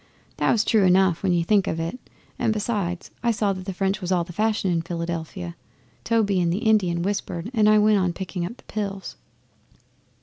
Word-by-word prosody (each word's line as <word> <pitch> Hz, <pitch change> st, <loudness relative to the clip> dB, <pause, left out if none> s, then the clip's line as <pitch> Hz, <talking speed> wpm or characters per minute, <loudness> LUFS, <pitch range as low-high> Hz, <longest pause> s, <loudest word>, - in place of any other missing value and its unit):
That -, -, +2 dB
was 220 Hz, -2 st, +3 dB
true 220 Hz, -3 st, +3 dB
enough 185 Hz, -2 st, +4 dB
when 195 Hz, -, +1 dB
you 170 Hz, -1 st, +2 dB
think 200 Hz, +2 st, +2 dB
of 165 Hz, -, -2 dB
it, 165 Hz, +10 st, -3 dB, 0.4 s
and -, -, +2 dB
besides 205 Hz, -5 st, -2 dB
I 235 Hz, -, +1 dB
saw 210 Hz, -3 st, +1 dB
that 185 Hz, -1 st, -8 dB
the 195 Hz, -, -3 dB
French 195 Hz, +2 st, -1 dB
was 180 Hz, 0 st, -3 dB
all 180 Hz, -2 st, +2 dB
the 175 Hz, -, -10 dB
fashion 215 Hz, -1 st, +1 dB
in 165 Hz, -1 st, +1 dB
Philadelphia. 165 Hz, -, -5 dB, 0.5 s
Toby 205 Hz, -5 st, +2 dB
and 170 Hz, -1 st, +1 dB
the 175 Hz, -, 0 dB
Indian 185 Hz, -6 st, +2 dB
whispered 195 Hz, 0 st, -3 dB
and 215 Hz, -3 st, +4 dB
I 215 Hz, -, +6 dB
went 210 Hz, -1 st, +4 dB
on 185 Hz, -2 st, +1 dB
picking 180 Hz, 0 st, -5 dB
up 195 Hz, +8 st, -5 dB
the -, -, -19 dB
pills. 200 Hz, -2 st, -5 dB
190 Hz, 205 wpm, -24 LUFS, 175-210 Hz, 0.5 s, I